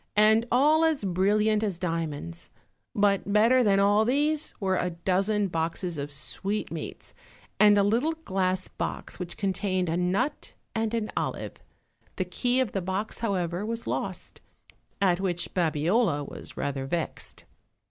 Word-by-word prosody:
and 220 +2 +5
all 300 +6 +4
as 320 -7 +2
brilliant 210 +3 +2
as 200 -5 -1
diamonds; 165 -1 -4 0.5
but 200 -1 +2
better 230 +5 +5
than 200 -3 +4
all 205 +2 +4
these 295 +5 +1
were 190 -2 +1
a 180 - 0
dozen 195 +4 +1
boxes 170 +1 -2
of 145 +1 -4
sweetmeats, 200 +8 -3 0.5
and 210 -1 +7
a 200 - +5
little 235 +11 +2
glass 185 -1 0
box - - -5
which 180 -2 -6
contained 185 -2 -1
a 165 - 0
nut 185 +11 -1 0.2
and 225 0 -1
an 220 -2 -2
olive; - - -3 0.6
the 185 - -1
key 245 +8 0
of 255 -6 +1
the 195 - -2
box, 190 +4 -3
however, 185 -4 -1
was 230 +2 -3
lost, - - -4 0.6
at 185 -3 +3
which 175 -3 -2
Babiola 165 - +1
was - - -9
rather 135 -1 -2
vexed. 165 +2 -4
195 Hz, 145 wpm, -27 LUFS, 175-220 Hz, 0.6 s, and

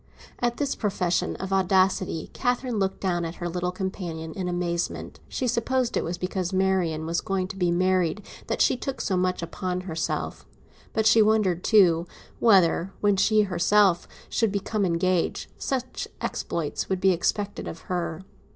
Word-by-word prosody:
At 240 -1 0
this 285 -2 0
profession 185 -4 0
of 190 +1 -4
audacity 190 -3 +2
Catherine 245 -2 -1
looked 190 -1 -1
down 175 -3 0
at 165 +1 -4
her 175 - -4
little 180 +1 -2
companion 175 -4 -5
in 185 +1 -3
amazement. 175 -1 -2
She 255 - -2
supposed 245 +1 0
it - - +1
was 175 +1 -3
because 180 0 -2
Marian 185 -5 +1
was 170 +1 -1
going 190 -1 -1
to 195 - -6
be 180 -2 +1
married 185 +2 +1 0.2
that - - -1
she - - +3
took 260 0 -4
so 195 - 0
much 180 -1 0 0.2
on 180 -1 -1
herself; 165 -3 -3 0.5
but 220 -1 +1
she 220 0 +6
wondered 210 -5 +2
too, 180 -6 +4 0.3
whether, 190 -4 +4
when 205 -1 +3
she 210 +3 +4
herself 190 0 +3 0.2
should 225 -3 +1
become 200 0 -1
engaged, 175 +1 0
such 255 -2 -3
exploits 160 -3 -3
would 190 -1 0
be 190 0 +4
expected 200 +3 -1
of 165 - -7
her. 175 -1 -3
185 Hz, 160 wpm, -26 LUFS, 175-205 Hz, 0.5 s, she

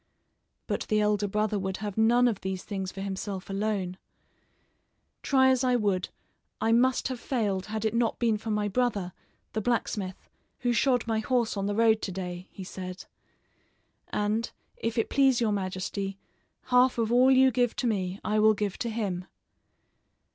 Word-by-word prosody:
But - - -3
the 215 - +2
elder 210 -1 +2
brother 210 +1 0
would 190 0 -3
have 205 -2 -5
none 235 +3 +4
of 220 -5 -1
these 190 -1 -3
things 190 -3 -4
for 195 - -7
himself 195 0 -4
alone. 195 -2 -2 1.2
"Try 265 -1 +4
as 260 0 +2
I 250 -1 +3
would, 200 -5 0 0.5
I 225 - +1
must 250 +3 +3
have 255 -2 -4
failed 205 -7 -1
had 220 0 -3
it 220 - +1
not 235 -1 +1
been 225 -3 +1
for 220 - -6
my 210 -1 0
brother, 205 -5 -1 0.4
the 220 - -1
blacksmith, 205 -5 -2 0.3
who 245 -1 +1
shod 250 0 +2
my 225 -1 0
horse 235 0 0
on 200 0 -1
the 205 - -1
road 220 0 +4
to 195 - -3
day," 180 -1 -6
he 195 - -9
said; 185 0 -7 1.0
"and, 210 +2 -1 0.3
if 230 +1 -3
it 225 - +2
please 270 -3 +4
your 230 -3 +1
majesty, 195 0 -3 0.5
half 250 0 +4
of 230 -1 0
all 250 +2 +5
you 265 0 +6
give 245 -1 +1
to 255 - -2
me 195 -4 -1
I 215 0 +1
will 215 0 +5
give 200 -2 -3
to 235 - -2
him." 200 -5 -3
215 Hz, 175 wpm, -28 LUFS, 195-235 Hz, 1.2 s, you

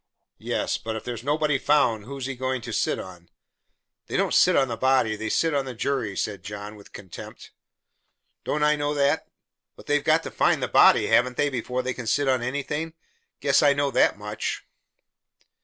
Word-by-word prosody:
"Yes, - - -2
but 110 0 -5
if 110 - -6
there's 120 -2 -6
nobody 150 0 +1
found, 125 -8 +2
who's 135 0 -6
he 135 - -3
goin' 130 0 -2
to 120 -2 -6
sit - - 0
on?" 90 -2 -10 0.8
"They - - -2
don't - - +1
sit - - +5
on 135 - +3
the 115 - -3
body, 130 -2 +2
they 110 +1 -4
sit 165 +7 +1
on 140 -1 0
the 130 -2 -7
jury," 115 -5 -2
said 100 -4 -3
John, 105 +2 -8
with 100 -1 -16
contempt. 95 -4 -11 0.9
"Don't 150 0 -1
I 150 0 +4
know 145 0 -2
that? 140 -1 +1 0.5
But - - -15
they've 145 0 +1
got 160 +1 +3
to - - -6
find - - +1
the - - 0
body, - - +5
haven't 125 0 +2
they, 145 - +2
before 125 -1 -3
they 130 0 -2
can 125 -1 -7
sit 140 +5 +1
on 130 -2 +2
anything? 150 +5 -3 0.5
Guess 140 0 +3
I 145 -2 +5
know 140 0 0
that - - +3
much." 105 +1 -4
130 Hz, 195 wpm, -25 LUFS, 110-145 Hz, 0.9 s, sit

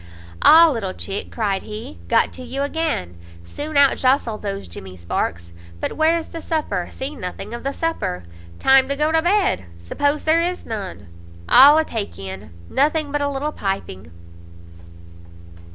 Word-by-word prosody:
"Ah, 330 +2 +8
little 205 -8 -3
chick!" 195 0 -5
cried 205 -4 -1
he, 215 - -8
"got - - +2
to - - -9
you 260 +3 -3
again! 285 - -2 0.3
soon 295 - -4
out 280 -1 +6
jostle 255 -4 +1
those 195 - -5
jemmy 90 +2 -10
sparks! 85 0 -3 0.3
But - - -3
where's 320 +1 +1
the 330 - -7
supper? 290 - -2
see 275 +3 -5
nothing 195 +1 -7
of 235 - -5
the 275 - -1
supper! 280 - -3 0.3
Time 265 0 +4
to 280 - 0
go 300 +2 +1
to 320 0 +3
bed, 380 - +1
suppose 285 - -1
there 320 +1 +3
is 355 +1 -2
none; 195 - -6 0.4
all 285 +4 +8
a 315 - +2
take 220 -7 -5
in; 95 +1 -8 0.2
nothing 300 - +1
but 290 0 -1
a 285 - 0
little 285 +2 -2
piping." 195 - -4
265 Hz, 160 wpm, -21 LUFS, 195-305 Hz, 0.4 s, Ah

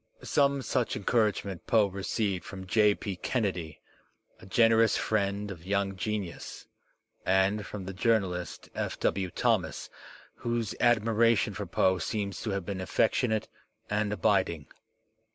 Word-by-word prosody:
Some 140 -1 +2
such 110 - 0
encouragement 100 -4 0
Poe 110 -2 +5
received 100 -1 -2
from 95 -1 -8
J. 105 +1 +4
P. 100 -2 -5
Kennedy, 90 - -2 0.6
a - - -13
generous 115 +2 +4
friend 100 -1 -1
of 85 -4 -9
young 100 +1 0
genius, 100 -2 -4 0.6
and 95 +3 +2
from 100 -3 -6
the 95 - -5
journalist, 95 -4 0
F. - - -3
W. 95 -2 0
Thomas, - - 0 0.5
whose 120 -3 -2
admiration 115 -1 +3
for 100 0 -5
Poe 95 0 +2
seems 100 +1 -3
to 110 - -3
have 100 -3 -2
been 95 -1 -4
affectionate 110 +4 +1 0.4
and 105 0 0
abiding. 95 -6 +1
100 Hz, 130 wpm, -29 LUFS, 95-110 Hz, 0.6 s, Poe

